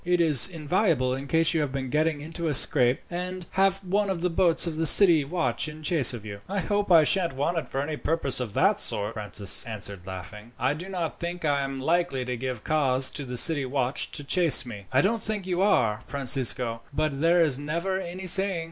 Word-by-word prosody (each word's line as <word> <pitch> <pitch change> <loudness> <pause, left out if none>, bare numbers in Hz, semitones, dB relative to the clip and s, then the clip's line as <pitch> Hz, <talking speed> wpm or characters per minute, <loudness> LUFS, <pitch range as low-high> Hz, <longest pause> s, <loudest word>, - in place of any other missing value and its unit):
It 180 0 0
is 155 -5 +7
invaluable 160 - -1
in 135 +2 -7
case 165 +3 +1
you 160 - 0
have 145 -3 -3
been 130 -2 -6
getting 155 0 -1
into 165 +2 -6
a 150 - -1
scrape, 125 -1 +2
and 180 +1 -6
have 195 0 0
one 200 +2 -1
of 185 -3 -4
the 180 0 -1
boats 170 -1 +1
of 165 -2 -5
the 160 0 +1
city 170 -6 +9
watch 165 +2 -3
in 155 +1 -12
chase 150 -5 +3
of 115 -4 -9
you." 100 -1 -9
"I 200 +1 -3
hope 205 0 -2
I 165 -2 +6
sha'n't 170 -3 -1
want 165 +5 -2
it - - -10
for 135 - -3
any 150 +1 -5
purpose 155 -5 -2
of 120 -5 -6
that - - +2
sort," 105 +1 0
Francis 105 -2 +2
answered, 100 -5 -7
laughing. 105 +5 -10
"I 130 +4 -1
do 175 +5 -9
not 175 -4 -5
think 170 0 -6
I 145 -2 0
am 135 0 -5
likely 155 -2 -2
to 125 0 -4
give 125 -2 -6
cause 135 -4 +1
to 145 - -5
the 125 -1 -7
city 155 0 +4
watch 130 0 -3
to 145 - -7
chase 160 -3 +4
me." 105 -5 -11
"I 130 +1 +2
don't 220 +5 -1
think 210 -3 -5
you 180 -1 -2
are, 115 - +1
Francisco, 125 -4 0
but 145 -1 -3
there 170 +1 +3
is 140 -4 +1
never 170 +6 -4
any 185 +1 -8
saying." 190 0 +3
155 Hz, 225 wpm, -24 LUFS, 130-175 Hz, -, city